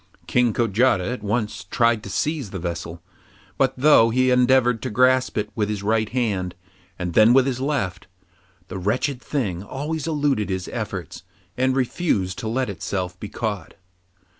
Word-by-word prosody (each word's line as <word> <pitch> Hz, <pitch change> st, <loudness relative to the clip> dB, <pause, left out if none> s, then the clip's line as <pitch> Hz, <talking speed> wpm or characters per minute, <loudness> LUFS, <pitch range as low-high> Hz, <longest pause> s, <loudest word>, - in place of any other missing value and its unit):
King 125 Hz, -2 st, +2 dB
Kojata 110 Hz, -2 st, +2 dB
at 125 Hz, -, -6 dB
once 105 Hz, +1 st, -2 dB
tried 115 Hz, -2 st, +2 dB
to 100 Hz, -, -9 dB
seize 145 Hz, +3 st, -2 dB
the 95 Hz, -, -6 dB
vessel, 85 Hz, -1 st, -5 dB, 0.6 s
but 135 Hz, -1 st, +2 dB
though 130 Hz, -4 st, +6 dB
he 130 Hz, +2 st, +2 dB
endeavoured 125 Hz, -2 st, +3 dB
to -, -, -3 dB
grasp 130 Hz, +3 st, +2 dB
it 105 Hz, 0 st, -2 dB
with 105 Hz, -2 st, -1 dB
his 105 Hz, -2 st, -3 dB
right 110 Hz, +1 st, +1 dB
hand, 100 Hz, -7 st, -1 dB, 0.4 s
and 90 Hz, -2 st, -4 dB
then 110 Hz, +5 st, +6 dB
with 130 Hz, 0 st, +5 dB
his 130 Hz, -2 st, -2 dB
left, 125 Hz, -10 st, -2 dB, 0.6 s
the 95 Hz, 0 st, -6 dB
wretched 125 Hz, +7 st, -1 dB
thing 110 Hz, -, -2 dB
always 145 Hz, +8 st, -4 dB
eluded 145 Hz, -9 st, 0 dB
his 95 Hz, -1 st, -3 dB
efforts -, -, -5 dB, 0.3 s
and 130 Hz, +1 st, +1 dB
refused 120 Hz, -, 0 dB
to 110 Hz, -, -4 dB
let 130 Hz, +4 st, 0 dB
itself 90 Hz, -2 st, -4 dB
be 105 Hz, -, -6 dB
caught. 105 Hz, -3 st, -4 dB
115 Hz, 165 wpm, -23 LUFS, 100-130 Hz, 0.6 s, though